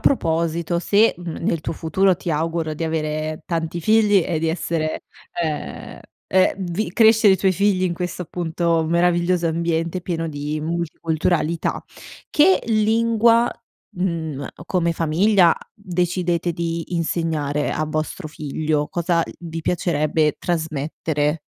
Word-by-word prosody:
proposito 170 Hz, -, +1 dB
se, 210 Hz, +5 st, +3 dB
mhmm, 175 Hz, -2 st, -6 dB
nel 160 Hz, -2 st, 0 dB
tuo -, -, -3 dB
futuro 180 Hz, +4 st, +2 dB
ti 175 Hz, 0 st, -5 dB
auguro 160 Hz, 0 st, -1 dB
di 165 Hz, -, -3 dB
avere 155 Hz, -1 st, -2 dB
tanti 165 Hz, 0 st, -2 dB
figli 210 Hz, +1 st, +4 dB
e 165 Hz, -2 st, -1 dB
di 165 Hz, 0 st, 0 dB
essere 160 Hz, -1 st, -2 dB, 0.4 s
ehm, 155 Hz, -2 st, -5 dB, 0.3 s
e 185 Hz, 0 st, +3 dB
vi 180 Hz, +1 st, -3 dB
crescere 220 Hz, -2 st, +6 dB
i -, -, -1 dB
tuoi 190 Hz, -1 st, +3 dB
figli 190 Hz, 0 st, +2 dB
in 175 Hz, -, 0 dB
questo, 180 Hz, +1 st, -4 dB
appunto, 170 Hz, -1 st, -1 dB
meraviglioso 175 Hz, +1 st, +2 dB
ambiente 165 Hz, +1 st, -1 dB
pieno 165 Hz, -2 st, -2 dB
di 150 Hz, +1 st, -4 dB
multiculturalità. 165 Hz, 0 st, -1 dB, 0.5 s
Che 345 Hz, +6 st, +4 dB
lingua, 230 Hz, +1 st, +3 dB, 0.5 s
mhmm, 160 Hz, -6 st, -2 dB, 0.2 s
come 170 Hz, -2 st, +1 dB
famiglia, 170 Hz, +3 st, +3 dB, 0.2 s
decidete 180 Hz, -3 st, -1 dB
di 165 Hz, 0 st, -4 dB
insegnare 160 Hz, -3 st, -1 dB
a 155 Hz, -, -1 dB
vostro 155 Hz, +2 st, -3 dB
figlio? 150 Hz, 0 st, -2 dB
Cosa 170 Hz, -1 st, +1 dB, 0.2 s
vi 165 Hz, -1 st, -6 dB
piacerebbe 155 Hz, -3 st, +1 dB
trasmettere? 155 Hz, -2 st, -1 dB
170 Hz, 125 wpm, -21 LUFS, 160-180 Hz, 0.5 s, crescere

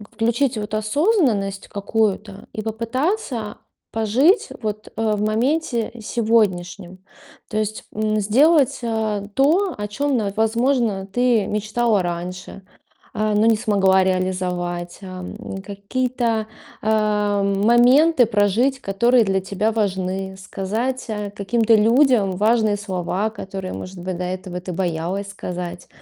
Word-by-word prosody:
включить 235 Hz, +3 st, +1 dB
вот 210 Hz, 0 st, -5 dB
осознанность 215 Hz, -, +1 dB
какую-то 205 Hz, -1 st, -2 dB
и 215 Hz, -, -4 dB
попытаться 230 Hz, -, -2 dB, 0.3 s
пожить 245 Hz, -, +3 dB
вот, 215 Hz, -1 st, -4 dB
э, 225 Hz, -1 st, +1 dB
в 205 Hz, -, -2 dB
моменте 235 Hz, +3 st, 0 dB
сегодняшнем. 195 Hz, -5 st, 0 dB, 0.5 s
То 215 Hz, -, -3 dB
есть, 215 Hz, 0 st, -2 dB
м, 215 Hz, 0 st, 0 dB
сделать, 270 Hz, +8 st, +3 dB
э, 220 Hz, -3 st, -1 dB
то, 335 Hz, +8 st, +3 dB
о 205 Hz, 0 st, -3 dB
чём 275 Hz, +6 st, -1 dB
на 205 Hz, -3 st, -1 dB
возможно, 225 Hz, -2 st, +1 dB
ты 240 Hz, 0 st, +2 dB
мечтала 215 Hz, +1 st, +1 dB
раньше, 180 Hz, +2 st, -5 dB, 0.5 s
а, 215 Hz, 0 st, 0 dB
но 210 Hz, +1 st, +3 dB
не 225 Hz, -1 st, +5 dB
смогла 195 Hz, -4 st, +3 dB
реализовать, 180 Hz, -2 st, -2 dB
ам. 185 Hz, -1 st, -7 dB, 0.3 s
Какие-то, 225 Hz, +2 st, -2 dB, 0.3 s
э, 210 Hz, -1 st, +1 dB
моменты 240 Hz, +9 st, +4 dB
прожить, 225 Hz, +5 st, +1 dB
которые 235 Hz, +5 st, +3 dB
для 195 Hz, -2 st, +1 dB
тебя 200 Hz, +3 st, -1 dB
важны. 190 Hz, -3 st, -2 dB
Сказать, 215 Hz, +7 st, -3 dB
а, 210 Hz, -1 st, -3 dB
каким-то 220 Hz, +3 st, +1 dB
людям 230 Hz, -1 st, +4 dB
важные 215 Hz, +2 st, +2 dB
слова, 195 Hz, +1 st, -2 dB
которые, 190 Hz, -3 st, -6 dB
может 185 Hz, +1 st, -7 dB
быть, 180 Hz, 0 st, -4 dB
до 180 Hz, -, -3 dB
этого 185 Hz, 0 st, -5 dB
ты 180 Hz, 0 st, -6 dB
боялась 180 Hz, +2 st, -2 dB
сказать. 180 Hz, -3 st, -6 dB
210 Hz, 120 wpm, -21 LUFS, 195-235 Hz, 0.5 s, не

